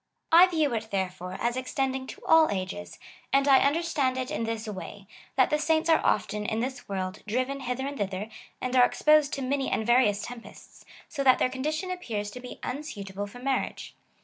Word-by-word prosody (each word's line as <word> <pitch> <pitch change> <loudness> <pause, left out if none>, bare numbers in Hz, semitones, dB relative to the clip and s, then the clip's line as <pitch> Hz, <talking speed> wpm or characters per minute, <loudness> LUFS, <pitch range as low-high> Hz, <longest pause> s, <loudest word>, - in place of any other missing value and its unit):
I 345 +3 +9
view 315 -7 +1
it, 220 -1 -3
therefore, 185 -2 -3
as 235 +1 0
extending 260 0 -2
to - - -10
all 320 -1 +6
ages, 195 +1 -4 0.3
and 275 +1 +3
I 270 -2 +7
understand 285 -3 +1
it 255 0 -3
in 230 - -2
this 225 0 -4
way, 200 -1 -7 0.3
that 260 - +3
the 300 - +2
saints 320 +1 +2
are 320 - +4
often, 210 +1 0
in 220 +1 -2
tliis 260 0 -4
world, 190 0 -3
driven 255 +5 -1
hither 255 0 -3
and 280 0 -5
thither, 195 +1 -2 0.3
and 255 0 -3
are 250 - +7
exposed 300 +3 +4
to 275 - -3
many 270 +1 0
and 220 - -1
various 235 -4 +3
tempests,^ 245 -1 -12 0.2
so 275 - -3
that 260 -2 +6
their - - +2
condition 310 +8 -3
appears 220 - -4
to 250 - -8
be 250 0 -9
imsuitable 205 -8 -5
for 205 - -12
marriage. 265 +1 -2
255 Hz, 195 wpm, -27 LUFS, 210-280 Hz, 0.3 s, I